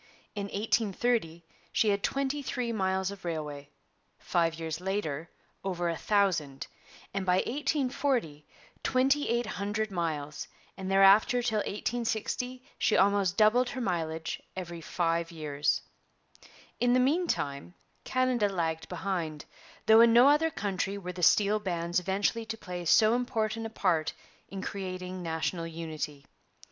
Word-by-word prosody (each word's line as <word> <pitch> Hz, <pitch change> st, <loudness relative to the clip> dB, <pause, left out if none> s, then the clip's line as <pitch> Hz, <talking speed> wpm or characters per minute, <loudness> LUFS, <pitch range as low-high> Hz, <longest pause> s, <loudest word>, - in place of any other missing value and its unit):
In 205 Hz, -1 st, -3 dB
1830 205 Hz, -4 st, 0 dB, 0.3 s
she 220 Hz, -, +2 dB
had 200 Hz, 0 st, +1 dB
twenty 275 Hz, +4 st, -1 dB
three 250 Hz, -3 st, -2 dB
miles 190 Hz, -2 st, 0 dB
of 200 Hz, -1 st, -10 dB
railway, 150 Hz, -4 st, -4 dB, 0.5 s
five 165 Hz, -1 st, 0 dB
years 160 Hz, 0 st, -4 dB
later 175 Hz, -5 st, -2 dB, 0.3 s
over 175 Hz, -3 st, -1 dB
a 165 Hz, -, -1 dB
thousand, 170 Hz, -9 st, 0 dB, 0.5 s
and 195 Hz, 0 st, -1 dB
by 180 Hz, -1 st, +3 dB
1840 255 Hz, -, 0 dB, 0.4 s
twenty 270 Hz, +3 st, +2 dB
eight 235 Hz, +1 st, +1 dB
hundred 205 Hz, +2 st, -2 dB
miles; 150 Hz, -5 st, -3 dB, 0.3 s
and 190 Hz, -1 st, -5 dB
thereafter 200 Hz, +5 st, +5 dB
till 220 Hz, -3 st, +1 dB
1860 240 Hz, +4 st, -2 dB, 0.2 s
she -, -, +3 dB
almost 200 Hz, -1 st, +3 dB
doubled 240 Hz, +4 st, +4 dB
her 260 Hz, -, -5 dB
mileage 165 Hz, -6 st, -2 dB
every 175 Hz, -2 st, -6 dB
five 165 Hz, 0 st, -1 dB
years. 150 Hz, -3 st, -1 dB, 1.0 s
In 245 Hz, 0 st, +3 dB
the 255 Hz, -, +4 dB
meantime 180 Hz, -, 0 dB, 0.3 s
Canada 255 Hz, -5 st, +1 dB
lagged 160 Hz, -4 st, -2 dB
behind, 175 Hz, -4 st, -3 dB, 0.4 s
though 220 Hz, +1 st, +8 dB
in 235 Hz, 0 st, +7 dB
no 240 Hz, +4 st, +7 dB
other 300 Hz, +3 st, +4 dB
country 195 Hz, -, -2 dB
were 180 Hz, -2 st, -6 dB
the 180 Hz, -, -7 dB
steel 205 Hz, +4 st, +4 dB
bands 175 Hz, -3 st, -1 dB
eventually 200 Hz, +5 st, -1 dB
to 225 Hz, 0 st, -4 dB
play 180 Hz, -4 st, -6 dB
so 215 Hz, +6 st, +5 dB
important 225 Hz, -2 st, -1 dB
a -, -, -9 dB
part 175 Hz, -8 st, 0 dB, 0.4 s
in 195 Hz, -1 st, -6 dB
creating 185 Hz, -1 st, -5 dB
national 165 Hz, 0 st, -2 dB
unity. 155 Hz, -3 st, -6 dB
195 Hz, 135 wpm, -29 LUFS, 170-225 Hz, 1.0 s, though